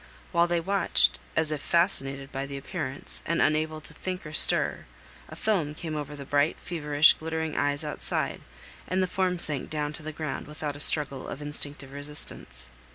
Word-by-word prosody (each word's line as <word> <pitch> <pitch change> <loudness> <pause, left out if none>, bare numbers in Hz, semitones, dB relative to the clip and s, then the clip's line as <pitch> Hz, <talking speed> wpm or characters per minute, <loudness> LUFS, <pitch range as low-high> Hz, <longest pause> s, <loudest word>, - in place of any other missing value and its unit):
While 170 -1 +4
they 175 0 +1
watched, 195 +4 +4 0.2
as 160 -1 +2
if 150 -2 -2
fascinated 140 -5 +1
by 135 +1 -3
the 140 0 -5
appearance, 140 -2 -4
and 170 - 0
unable 155 +1 +2
to - - -9
think 185 -1 -5
or 150 - -7
stir, - - +4 0.4
a - - -8
film 165 -9 0
came 155 -1 -4
over 150 -1 -4
the 140 -1 -8
bright, 145 +2 +2
feverish, 150 -3 +4
glittering 160 -1 -3
eyes 145 +1 +1
outside, 150 - -2 0.5
and 185 +1 +1
the - - +3
form 185 0 0
sank 150 -5 +2
down 150 -1 -2
to - - -6
the 155 0 -5
ground 155 -2 -4
without 150 -1 -4
a - - -9
struggle 145 -3 +2
of - - -6
instinctive 145 -2 -3
resistance. 140 - -4
150 Hz, 180 wpm, -28 LUFS, 145-165 Hz, 0.5 s, While